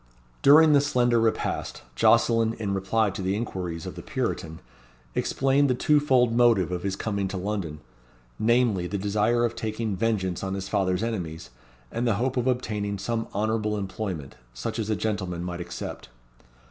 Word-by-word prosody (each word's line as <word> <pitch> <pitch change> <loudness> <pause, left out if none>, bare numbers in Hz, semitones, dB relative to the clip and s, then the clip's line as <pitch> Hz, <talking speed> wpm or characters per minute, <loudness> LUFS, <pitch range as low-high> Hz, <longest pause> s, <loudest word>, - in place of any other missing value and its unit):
During 155 +2 +7
the 140 - +6
slender 120 -4 +2
repast, 115 -1 -1
Jocelyn, 115 -1 +4
in 100 -3 -3
reply 100 +2 +1
to 95 - -6
the 95 +1 0
inquiries 90 -7 -4
of - - -5
the - - -8
Puritan, 80 0 -3 0.6
explained 135 - +2
the 125 - +2
two 150 +4 +3
fold 125 -5 +3
motive 115 -7 +4
of 90 -1 -2
his 95 0 -2
coming 100 -1 -2
to 95 0 -4
London; 90 -6 -3 0.6
namely, 115 -5 +2
the 100 - -3
desire 105 +4 +1
of 120 0 -2
taking 110 -1 -3
vengeance 95 -5 -1
on 95 0 -2
his 95 -1 -4
father's 95 -1 0
enemies, 85 - -4 0.4
and 120 +1 -1
the 115 - +2
hope 130 +4 -1
of 125 0 0
obtaining 105 -5 -1
some 115 +3 -2
honourable 105 0 0
employment, 95 -7 -4 0.2
such 115 - -4
as 110 -1 -2
a 110 - +2
gentleman 95 -4 -2
might 90 0 -4
accept. 90 -6 -7
105 Hz, 170 wpm, -26 LUFS, 95-115 Hz, 0.6 s, During